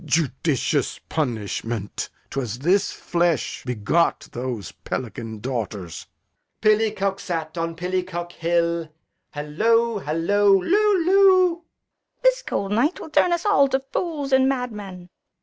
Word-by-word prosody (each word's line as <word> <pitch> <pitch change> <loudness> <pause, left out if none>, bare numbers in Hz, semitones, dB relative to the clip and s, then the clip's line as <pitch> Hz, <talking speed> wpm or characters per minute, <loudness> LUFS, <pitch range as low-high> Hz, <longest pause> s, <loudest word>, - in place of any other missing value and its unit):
Judicious 150 -3 0
punishment! 115 -6 -3 0.2
'Twas 120 -5 -3
this 180 +9 +2
flesh 170 -4 -1
begot 125 +8 0
Those 120 -4 -4
pelican 115 -2 -5
daughters. 110 -9 -4 0.5
Edg. - - -53
Pillicock 210 -2 +2
sat 165 -4 -4
on 165 -1 -2
Pillicock's 180 0 -3
Hill. 170 -1 0 0.5
'Allow, 220 +9 +1
'allow, 165 +7 +1
loo, 385 - +3
loo! 370 -2 +5
Fool. 345 - -29 0.6
This - - +4
cold 200 - -3
night 250 - +1
will 320 - -9
turn 350 - +3
us 345 +2 0
all 405 -10 +5
to 265 0 +1
fools 285 +1 -3
and 265 0 +5
madmen. 210 -9 -5
180 Hz, 120 wpm, -23 LUFS, -, 0.6 s, loo